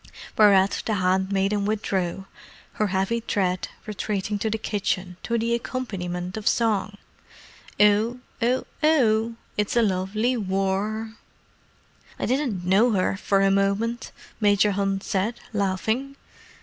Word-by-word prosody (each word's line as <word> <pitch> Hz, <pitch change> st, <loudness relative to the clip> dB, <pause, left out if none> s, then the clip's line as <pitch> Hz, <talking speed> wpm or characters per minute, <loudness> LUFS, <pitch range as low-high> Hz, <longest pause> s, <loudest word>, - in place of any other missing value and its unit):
Whereat, 200 Hz, -2 st, +5 dB
the 220 Hz, -, +1 dB
handmaiden 195 Hz, +2 st, +1 dB
withdrew, 195 Hz, -3 st, -1 dB, 0.6 s
her 215 Hz, -, +3 dB
heavy 195 Hz, +5 st, 0 dB
tread 185 Hz, -4 st, -1 dB, 0.2 s
retreating 205 Hz, -1 st, -3 dB
to 220 Hz, -, -1 dB
the 220 Hz, -, -1 dB
kitchen 195 Hz, -4 st, -2 dB
to 235 Hz, -, -1 dB
the 230 Hz, +1 st, 0 dB
accompaniment 185 Hz, -7 st, -4 dB
of 215 Hz, -, -4 dB
song. 215 Hz, -3 st, +1 dB, 0.8 s
"Ow—Ow—Ow, 235 Hz, +2 st, +2 dB, 0.2 s
it's 210 Hz, +2 st, 0 dB
a 235 Hz, -, +5 dB
lovely 210 Hz, +5 st, 0 dB
War!" 200 Hz, +2 st, -1 dB, 1.0 s
"I -, -, -2 dB
didn't 250 Hz, -9 st, -1 dB
know 210 Hz, +6 st, +4 dB
her 185 Hz, 0 st, +1 dB
for 195 Hz, 0 st, +1 dB
a 195 Hz, -, +4 dB
moment," 200 Hz, +5 st, 0 dB, 0.3 s
Major 205 Hz, -1 st, +4 dB
Hunt 195 Hz, 0 st, -1 dB
said, 205 Hz, +5 st, -1 dB
laughing. 220 Hz, +7 st, -1 dB
205 Hz, 115 wpm, -24 LUFS, 195-225 Hz, 1.0 s, Whereat